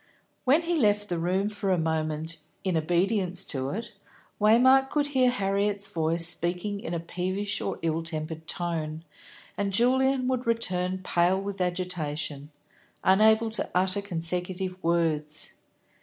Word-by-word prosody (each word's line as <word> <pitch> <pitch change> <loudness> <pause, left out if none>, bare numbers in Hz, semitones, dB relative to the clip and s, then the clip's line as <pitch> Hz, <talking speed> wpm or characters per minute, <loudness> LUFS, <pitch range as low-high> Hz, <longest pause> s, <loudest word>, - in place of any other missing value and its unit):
When 290 +6 +4
he 340 +1 0
left 210 -7 +2
the 175 -2 -1
room 185 +4 0
for 205 -2 -3
a 185 - +3
moment, 160 0 -1 0.3
in 185 -3 0
obedience 180 +3 +1
to 135 -2 -1
it, 220 +10 -5 0.5
Waymark 260 +5 +5
could 295 -1 +1
hear 255 -1 +4
Harriet's 200 -2 0
voice 165 -2 +3
speaking 180 +4 +1
in 170 -3 -4
a - - -1
peevish 185 +4 -3
or - - -3
ill 165 0 0
tempered 160 0 -5
tone, 160 -3 -2 0.6
and 200 -1 0
Julian 255 +4 +2
would 255 -2 -1
return 185 -5 0
pale 180 +2 +2
with 195 -1 -5
agitation, 155 -5 -3 0.5
unable 220 +3 +4
to 220 - -2
utter 185 +2 +2
consecutive 180 +1 -2
words. 160 -3 -1
185 Hz, 140 wpm, -27 LUFS, 165-205 Hz, 0.6 s, Waymark